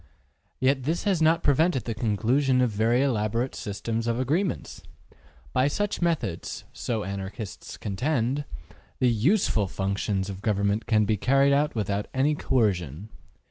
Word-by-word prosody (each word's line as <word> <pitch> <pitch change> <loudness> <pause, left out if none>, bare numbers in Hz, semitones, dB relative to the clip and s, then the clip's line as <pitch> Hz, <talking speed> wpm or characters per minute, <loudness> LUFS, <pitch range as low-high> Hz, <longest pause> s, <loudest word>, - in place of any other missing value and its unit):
Yet 135 +1 +2
this 160 +7 -1
has 195 -6 +1
not 160 +1 +3
prevented 145 -2 +2
the 115 - -2
conclusion 120 +5 +1
of 125 -2 +2
very 115 +5 +2
elaborate 115 -1 0
systems 115 +2 -3
of 115 +1 0
agreements. 160 +9 -1 0.7
By 130 +2 +3
such 205 +8 -1
methods, 160 - -2
so 110 -3 -2
Anarchists 100 +2 -6
contend, 125 +5 -1 0.5
the 125 -2 +3
USEFUL 115 - +2
functions 95 0 -1
of 95 -1 -7
government 100 0 0
can 105 -2 +3
be 105 +1 +1
carried 135 +5 +3
out 145 0 +1
without 105 -2 -1
any 140 +3 +3
coercion. 100 - 0
120 Hz, 140 wpm, -26 LUFS, 105-140 Hz, 0.7 s, not